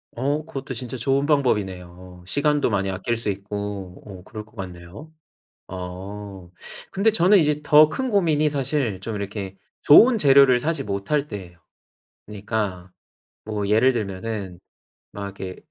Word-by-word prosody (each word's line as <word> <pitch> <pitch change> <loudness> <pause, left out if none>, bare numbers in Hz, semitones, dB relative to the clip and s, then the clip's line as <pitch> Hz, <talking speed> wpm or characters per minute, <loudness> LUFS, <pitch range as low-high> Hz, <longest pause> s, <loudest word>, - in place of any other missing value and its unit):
어 145 +5 -1
그것도 135 -3 -6
진짜 125 +1 -6
좋은 135 +3 +1
방법이네요. 95 - -1
시간도 145 +7 +1
많이 100 -1 0
아낄 95 +5 -2
수 115 -2 -2
있고 100 -2 -5
어 95 -3 -10
그럴 110 0 -8
것 110 +2 -24
같네요. 95 - -9 0.6
아 95 +1 -8 0.4
근데 210 +3 +2
저는 200 0 +5
이제 150 -2 +2
더 150 +1 +6
큰 260 +10 -3
고민이 160 -8 +2
사실 135 -7 -1
좀 115 - -5
이렇게 100 -1 -5 0.3
좋은 230 - +7
재료를 135 -5 +6
사지 160 +6 -1
못할 100 +9 -1
때예요. 90 -6 -9 0.7
그니까 100 -3 -4 0.5
뭐 105 -2 -3
예를 115 +5 +4
들면은 100 -3 -5 0.5
막 100 - -6 0.2
이렇게 95 -1 -5
110 Hz, 280 characters per minute, -23 LUFS, 95-145 Hz, 0.7 s, 좋은